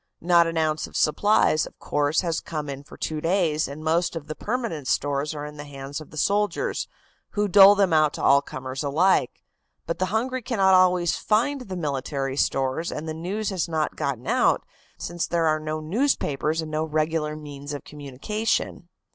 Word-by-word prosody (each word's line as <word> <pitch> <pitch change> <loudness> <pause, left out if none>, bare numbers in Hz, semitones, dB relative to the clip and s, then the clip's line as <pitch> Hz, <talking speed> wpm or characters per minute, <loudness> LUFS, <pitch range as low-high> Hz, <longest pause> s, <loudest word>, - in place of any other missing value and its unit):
Not 170 0 +4
an 165 0 -3
ounce 155 -1 0
of - - -6
supplies, 155 -1 +3
of - - -16
course, 145 +1 0
has 170 -3 -2
come 150 -3 -5
in 135 0 -7
for 145 - -14
two 155 -1 -3
days, 165 -3 +1
and 145 +3 -8
most 165 +2 +1
of 160 -3 -5
the 155 - -5
permanent 210 - -3
stores 145 +2 0
are 145 0 -5
in 150 0 -9
the 145 - -6
hands 140 0 -7
of 155 - -12
the 155 - -12
soldiers, 205 +3 0 0.5
who 210 0 +1
dole 200 +1 +8
them 195 -4 +2
out 155 -1 +4
to - - -5
all 140 +1 +6
comers 130 0 -6
alike. 150 0 +1 0.4
But 170 - -3
the 185 - +1
hungry 250 +6 -1
cannot 200 -6 +2
always 180 -2 +4
find 250 +6 +1
the 190 -6 -6
military 135 -3 -2
stores 135 +3 0
and 155 +2 -5
the 155 - -3
news 195 +7 -3
has 180 -3 -2
not 155 -2 -1
gotten 130 -3 -3
about, - - +2 0.3
since 175 -1 -3
there 170 -1 +1
are 155 -1 +2
no 155 0 -3
newspapers 160 - 0
and 155 - -7
no 155 +1 0
regular 155 0 -1
means 145 -1 -8
of 145 - -5
communication. 160 - -3
155 Hz, 190 wpm, -24 LUFS, 145-185 Hz, 0.5 s, dole